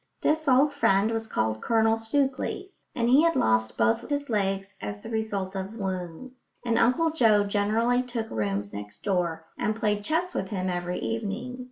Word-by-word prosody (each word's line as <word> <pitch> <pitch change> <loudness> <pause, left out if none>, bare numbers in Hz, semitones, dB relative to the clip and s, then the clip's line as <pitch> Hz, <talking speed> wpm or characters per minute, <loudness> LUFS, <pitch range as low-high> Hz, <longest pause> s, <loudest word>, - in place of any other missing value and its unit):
This 310 0 +1
old 275 +2 +4
friend 215 -6 +3
was 225 -1 -2
called 110 - -1
Colonel 225 -1 +3
Stookley, 270 - -1 0.2
and 235 -1 +1
he 260 +5 +6
had 330 0 +3
lost 110 0 +1
both 110 0 +1
his 285 -3 -2
legs 195 -1 -1
as 105 0 -5
the - - -8
result 205 -4 -2
of 190 +3 -5
wounds; 190 +5 -6
and 230 -1 +2
Uncle 255 +8 +3
Joe 225 -9 +4
generally 215 +5 +1
took 240 -3 -4
rooms 100 -1 -2
next 105 0 -8
door 175 -4 -1
and 215 - 0
played 210 -2 0
chess 340 - -1
with 190 - -2
him 185 -2 -2
every 175 0 -3
evening. 230 +3 -4
215 Hz, 175 wpm, -27 LUFS, 185-250 Hz, 0.2 s, he